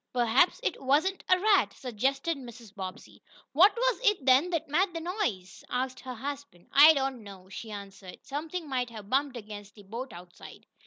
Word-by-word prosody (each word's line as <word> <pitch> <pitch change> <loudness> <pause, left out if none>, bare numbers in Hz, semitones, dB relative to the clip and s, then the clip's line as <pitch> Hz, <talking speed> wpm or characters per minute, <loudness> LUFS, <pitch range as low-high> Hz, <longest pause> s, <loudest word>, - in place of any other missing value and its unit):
"Perhaps 245 - +3
it 350 - -2
wasn't 305 +8 +1
a 365 - +5
rat," 380 - +3
suggested 270 +6 -1
Mrs. 240 -5 -12
Bobbsey. 185 -2 -8 0.3
"What 365 +9 +7
was - - +1
it, 415 - +2
then, 270 +6 +5
that 335 -3 -2
made 355 +6 +1
the - - -2
noise?" 320 - -3
asked 255 +1 -2
her 255 -1 -7
husband. 275 -7 -7
"I 300 +3 +9
don't 270 -3 -2
know," 190 -2 -12
she 220 +3 -8
answered. 200 -3 -9
"Something 310 +4 -5
might 250 -3 -2
have 215 -3 -11
bumped 270 -1 +1
against 205 -2 -10
the 205 - -14
boat 235 +6 -7
outside." 175 0 -13
260 Hz, 175 wpm, -29 LUFS, 210-315 Hz, 0.3 s, I